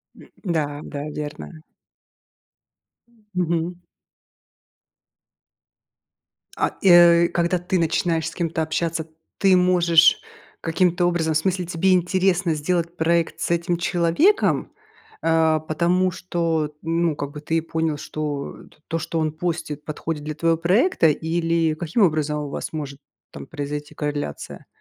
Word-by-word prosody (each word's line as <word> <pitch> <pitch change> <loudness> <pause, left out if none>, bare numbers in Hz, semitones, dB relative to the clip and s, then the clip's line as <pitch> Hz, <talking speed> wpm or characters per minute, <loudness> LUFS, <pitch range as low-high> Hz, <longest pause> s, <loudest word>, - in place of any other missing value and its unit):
М, - - -16
да, 150 -5 -2
да, 145 0 -6
верно. 150 +2 -7 1.4
М. 230 -2 -29
Мгм. 170 0 -1 2.8
А, - - +1
и, 195 - +4
э, 170 -1 +7
когда 175 +1 0
ты 180 0 -1
начинаешь 165 0 0
с - - -12
кем-то 165 -2 -2
общаться, 160 0 -2 0.3
ты 195 -2 +4
можешь 175 -2 +4 0.4
каким-то 175 +1 +1
образом 165 -2 +1
в 155 - +3
смысле, 185 +1 -1
тебе 180 +2 +1
интересно 180 -1 +2
сделать 170 +2 -1
проект 165 0 +1
с - - -2
этим 170 0 0
человеком, 175 - +2 0.5
а, 160 -1 +3
потому 175 +4 +1
что, 165 -4 -2
ну, 165 -1 0
как 145 0 -5
бы 150 0 -9
ты 165 +2 -1
и - - +1
понял, 160 -1 -2
что 145 -1 -5 0.3
то, 165 - -2
что 165 +1 -3
он 155 -1 0
постит, 160 -2 -4
подходит 155 0 -4
для 155 0 -5
твоего 165 0 +1
проекта, 185 - +3
или 165 +1 0
каким 170 +7 -1
образом 155 -3 +1
у 145 -1 -5
вас - - -5
может 140 -2 -6 0.3
там - - -9
произойти 145 -1 -6
корреляция? 145 - -5
165 Hz, 135 wpm, -22 LUFS, 155-175 Hz, 2.8 s, э